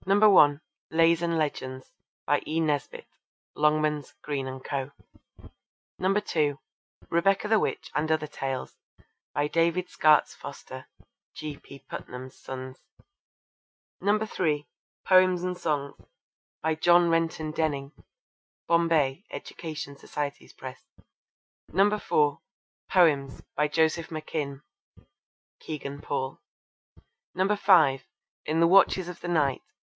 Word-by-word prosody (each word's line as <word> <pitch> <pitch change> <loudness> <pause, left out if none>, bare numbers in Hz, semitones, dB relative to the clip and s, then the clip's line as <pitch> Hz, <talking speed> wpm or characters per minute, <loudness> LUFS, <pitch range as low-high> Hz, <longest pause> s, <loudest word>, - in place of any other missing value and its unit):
(1) 195 -7 +6 0.3
Lays 165 +1 +4
and 170 -1 0
Legends. 130 -4 -3 0.3
By - - +2
E. 160 +2 0
Nesbit. 150 -3 -1 0.5
(Longmans, 150 -1 +1
Green 140 -3 -3
and 130 0 -8
Co.) 135 -1 -3 1.1
(2) 165 -7 +1 0.5
Rebecca 195 +5 +2
the 220 0 +4
Witch 160 - -3
and 155 +1 0
Other 155 -1 +1
Tales. 135 -3 -5 0.6
By 145 0 +1
David 170 +3 +1
Skaats 155 -1 +4
Foster. - - -9 0.5
(G. 150 -2 -6
P. 140 - -14
Putnam's 130 +1 -8
Sons.) 130 0 -8 1.2
(3) 185 -8 0 0.4
Poems 185 -1 +5
and 180 0 -2
Songs. 145 -5 -2 0.7
By 160 0 +2
John 175 +2 +4
Renton 165 -2 0
Denning. 145 -3 -2 0.8
(Bombay: 165 -2 +2
Education 155 -4 -7
Society's 140 +1 -5
Press.) 130 -1 -9 0.9
(4) 175 -7 +2 0.5
Poems. 145 -7 +3
By 150 +1 +2
Joseph 160 +2 +1
McKim. 150 -3 -5 1.0
(Kegan 145 -2 -6
Paul.) 130 -2 -3 1.0
(5) 185 -9 +4 0.4
In 155 +2 0
the 165 - +5
Watches 190 0 +5
of 180 - -8
the - - -5
Night. 150 -6 +1
155 Hz, 105 wpm, -27 LUFS, 140-170 Hz, 1.2 s, 1